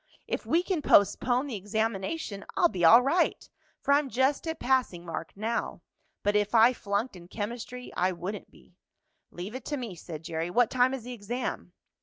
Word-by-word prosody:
If - - -3
we 340 +2 +3
can 365 -4 -1
postpone 245 +3 +3
the 270 -6 -5
examination 205 - -2
I'll 345 - +5
be 180 - -3
all 230 +9 +8
right, 335 +7 +1 0.4
for 280 - +3
I'm 285 -1 +2
just 265 +6 +1
at 320 0 -3
passing 245 -10 0
mark 165 -1 -5
now. 225 +3 -3 0.4
But 205 +1 +1
if 210 +2 +1
I 230 +3 +7
flunked 205 +1 -2
in 175 -1 -12
chemistry 240 +5 -6
I 185 +1 +2
wouldn't 185 +4 -6
be." - - -21 0.6
"Leave 180 +5 -7
it 260 - -7
to 295 - -2
me," 240 -7 -5
said 165 -2 -9
Jerry. 165 +1 -3
"What 240 +5 +3
time 255 +1 +3
is 255 - -8
the 250 +1 -6
exam?" 240 +3 -4
230 Hz, 185 wpm, -28 LUFS, 195-260 Hz, 0.6 s, all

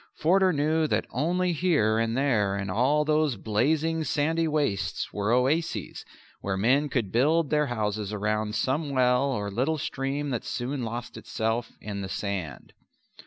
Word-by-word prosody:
Forder 185 +4 +3
knew 155 +1 +1
that - - 0
only 175 +7 0
here 145 -10 +2
and 115 +1 0
there 110 -8 +1
in 100 -1 -3
all 135 +9 +2
those 155 -3 +2
blazing, 155 +10 0
sandy 160 +2 0
wastes 145 -10 -1
were 105 +2 -1
oases 125 - 0 0.4
where 95 -1 -2
men 135 +8 +2
could 115 -8 -1
build 150 - +2
their 150 -1 +2
houses 105 -3 -2
round 105 +1 -1
some 145 +5 0
well 125 -1 +3
or 105 -5 -3
little 135 +10 0
stream 140 0 -3
that 120 - -2
soon 125 +3 -3
lost 120 +1 -5
itself 115 +1 -2
in 100 -2 -5
the 95 - -5
sand. 95 -7 -4
125 Hz, 155 wpm, -27 LUFS, 105-150 Hz, 0.4 s, Forder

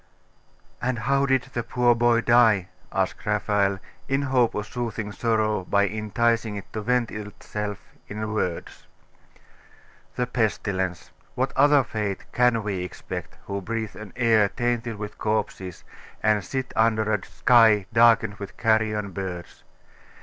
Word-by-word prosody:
'And 125 0 -1
how 140 +5 +1
did 130 -2 +2
the 120 - -1
poor 120 +1 +2
boy 120 0 +3
die?' 115 -6 +4 0.2
asked - - -1
Raphael, 100 -2 +1 0.3
in 135 +1 0
hope 130 -4 +2
of 105 - -2
soothing 110 -2 -4
sorrow 110 -1 0
by 100 +2 +2
enticing 110 +2 0
it 100 - -9
to 110 - -3
vent 125 +1 +1
itself 105 0 -5 0.3
in 110 +1 -4
words. 90 -5 -3 1.3
'The 125 - 0
pestilence. 100 -6 -2 0.2
What 130 +2 -1
other 145 0 +5
fate 105 -4 -4
can 125 -2 +2
we 100 -3 -2
expect, 90 - -7
who 100 0 -4
breathe 110 +1 -4
an 105 -3 -9
air 115 -4 +3
tainted 120 -1 -2
with 105 0 -7
corpses, 105 -4 -2 0.4
and 105 -2 +3
sit 130 -1 -4
under 110 -1 +2
a 100 -4 -1
sky 110 -5 +4
darkened 115 -3 +4
with 100 -1 -9
carrion 110 -2 +1
birds? 90 -3 -6
110 Hz, 135 wpm, -25 LUFS, 105-120 Hz, 1.3 s, other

